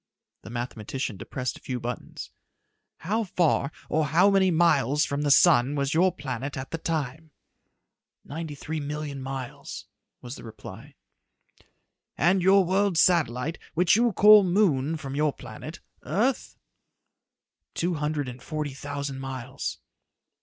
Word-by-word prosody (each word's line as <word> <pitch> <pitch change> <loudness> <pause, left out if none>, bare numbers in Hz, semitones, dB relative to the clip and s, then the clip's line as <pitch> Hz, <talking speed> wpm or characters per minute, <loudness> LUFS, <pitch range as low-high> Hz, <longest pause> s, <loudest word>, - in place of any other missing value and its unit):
The - - -11
mathematician 120 0 -4
depressed 125 +6 -5
a - - -32
few 125 -1 -4
buttons. 120 0 -6 0.7
"How 215 +7 0
far, 170 -6 +1 0.2
or 155 -1 +1
how 175 +8 +4
many 195 -1 +4
miles 155 -4 +3
from 140 +1 -2
the 145 - 0
sun 145 -3 +5
was 140 0 0
your 180 +3 +4
planet 135 -4 -5
at 130 0 -6
that 165 - -5
time?" 155 -1 -3 1.0
"Ninety 160 0 -6
three 155 +3 -5
million 145 -1 -5
miles," 130 -2 -6 0.3
was 125 +2 -8
the - - -11
reply. 110 -2 -11 1.2
"And 180 +4 +3
your 190 +1 +5
world's 190 -1 +2
satellite 160 -4 +2 0.2
which 175 +2 +4
you 235 +1 +3
call 210 +1 +8
moon 165 -6 +2
from 135 -3 -7
your 150 -1 +1
planet 155 +2 -10 0.2
earth?" 245 +6 -1 1.2
"Two 175 +1 0
hundred 150 -2 -2
and 125 0 -8
forty 150 -3 -4
thousand 140 0 -5
miles." 135 0 -5
150 Hz, 135 wpm, -26 LUFS, 135-175 Hz, 1.2 s, call